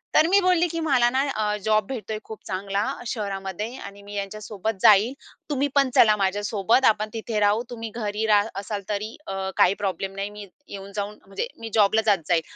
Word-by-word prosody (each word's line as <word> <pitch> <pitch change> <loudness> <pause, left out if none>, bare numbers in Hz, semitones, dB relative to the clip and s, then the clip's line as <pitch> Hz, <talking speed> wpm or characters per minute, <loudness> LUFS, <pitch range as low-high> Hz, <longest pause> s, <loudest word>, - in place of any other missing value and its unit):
तर 315 - +6
मी 390 +3 +5
बोलली, 360 -2 +3
की 330 0 -4
"मला 250 -5 +4
ना, 260 +2 +1
अ, 210 -1 0
जॉब 215 -1 +3
भेटतोय 220 -4 -5
खूप 220 - -9
चांगला 195 +1 -2 0.2
शहरामध्ये 200 +1 -4
आणि 200 0 -10
मी 205 0 -11
यांच्यासोबत 205 +1 -4
जाईल. 215 +5 +6 0.4
तुम्ही 285 0 +1
पण 275 -2 +4
चला 215 -2 +6
माझ्यासोबत 205 +4 +1
आपण 215 0 +3
तिथे 225 -1 -3
राहू, 210 +3 +3
तुम्ही 230 -2 -6
घरी 215 -1 -2
राहत 210 0 +4
असाल 200 0 -4
तरी 210 +2 -3
अ, 195 0 -3
काही 185 - +5
प्रॉब्लेम 195 0 -2
नाही. 195 +1 -3
मी 210 0 -9 0.2
येऊन-जाऊन 200 +1 -6
म्हणजे 195 - -3
मी 225 0 -6
जॉबला 220 0 +4
जात 205 -3 +4
जाईल." 170 -2 +3
210 Hz, 185 wpm, -24 LUFS, 200-225 Hz, 0.4 s, तर